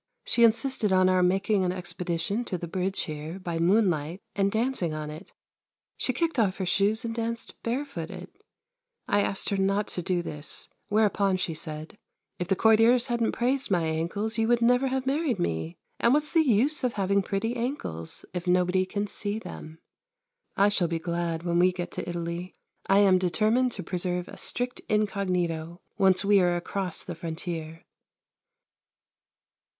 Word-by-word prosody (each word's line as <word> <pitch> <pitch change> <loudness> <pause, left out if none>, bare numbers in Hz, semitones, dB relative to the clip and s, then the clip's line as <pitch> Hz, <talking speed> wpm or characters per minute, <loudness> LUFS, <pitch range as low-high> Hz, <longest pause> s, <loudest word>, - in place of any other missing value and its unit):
She 235 - +3
insisted 230 -1 +3
on 185 0 +5
our 185 0 +3
making 190 +2 +2
an 180 - +1
expedition 180 +3 -3
to 185 - -3
the 170 - -6
Bridge 190 +3 -1
here, 155 +3 -5
by 170 -3 -4
moonlight, 175 -3 +2 0.2
and 200 -1 +2
dancing 220 -8 0
on 150 0 -5
it. 155 +6 -10 0.6
She - - -1
kicked 330 -5 -1
off 195 -4 +2
her 190 - -2
shoes 205 +5 +1
and 225 - -2
danced 230 0 -4
barefooted; 235 - -4 0.8
I 205 - +3
asked 195 - -1
her 200 - 0
not 195 +2 +1
to 180 - -3
do 175 0 -1
this, 150 -2 -6 0.2
whereupon 205 -2 +2
she 180 -2 -2
said: 155 +4 -7 0.4
"If 180 - -2
the 195 - +2
courtiers 225 +4 +5
hadn't 235 -1 +1
praised 260 +3 +1
my 175 -4 +2
ankles 170 +8 -1
you 225 - +2
would 240 0 +3
never 245 +3 +3
have 260 0 -1
married 280 -3 0
me 80 - -2 0.2
and 235 +4 +4
what's 300 0 +1
the 330 - +5
use 275 +2 +2
of 250 -2 +1
having 200 0 +1
pretty 205 +5 -2
ankles, 230 - -4
if 180 0 -4
nobody 180 +1 +2
can 205 +2 -2
see 205 +1 -3
them!" 165 -6 -9 0.8
I 200 +1 +5
shall 195 -4 +1
be 165 0 -1
glad 170 0 -2
when 170 0 +1
we 180 +1 +5
get 180 -1 -5
to - - -5
Italy. 170 +1 -4 0.3
I 195 - +4
am 190 -2 +5
determined 215 +8 +2
to - - -6
preserve 180 0 -2
a - - -11
strict 245 0 -2
incognito, 180 -5 -1 0.2
once 190 0 +4
we 200 -1 +5
are 175 -1 +2
across 180 +1 -2
the 175 - -6
frontier. 165 -1 -6
190 Hz, 170 wpm, -27 LUFS, 175-220 Hz, 0.8 s, on